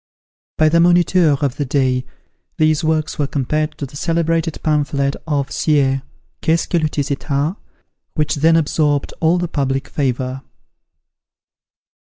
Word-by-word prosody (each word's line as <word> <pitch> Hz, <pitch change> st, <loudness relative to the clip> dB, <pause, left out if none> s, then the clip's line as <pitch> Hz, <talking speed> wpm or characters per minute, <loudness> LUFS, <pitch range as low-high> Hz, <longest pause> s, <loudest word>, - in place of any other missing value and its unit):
By 155 Hz, -, +4 dB
the 170 Hz, +2 st, +3 dB
Moniteur 175 Hz, -3 st, +4 dB
of 135 Hz, -3 st, -1 dB
the 145 Hz, -, 0 dB
day, 130 Hz, -2 st, 0 dB, 0.5 s
these 155 Hz, 0 st, +2 dB
works 155 Hz, -1 st, -1 dB
were 145 Hz, -, +1 dB
compared 155 Hz, +3 st, -2 dB
to 145 Hz, -, -4 dB
the 140 Hz, +2 st, -13 dB
celebrated 165 Hz, 0 st, 0 dB
pamphlet 140 Hz, -2 st, 0 dB
of 140 Hz, -3 st, -1 dB
Sieyes, 135 Hz, -3 st, +1 dB, 0.4 s
"Qu'est 165 Hz, +1 st, +2 dB
ce -, -, -4 dB
que 175 Hz, -, 0 dB
le 155 Hz, -1 st, 0 dB
tiers 145 Hz, -1 st, -2 dB
etat?" 140 Hz, +4 st, -1 dB, 0.6 s
which 150 Hz, -2 st, +1 dB
then 165 Hz, +3 st, +4 dB
absorbed 150 Hz, -2 st, +1 dB
all 165 Hz, +2 st, +3 dB
the 175 Hz, 0 st, -1 dB
public 135 Hz, -3 st, -2 dB
favour. 130 Hz, -2 st, -2 dB
150 Hz, 145 wpm, -18 LUFS, 140-160 Hz, 0.6 s, By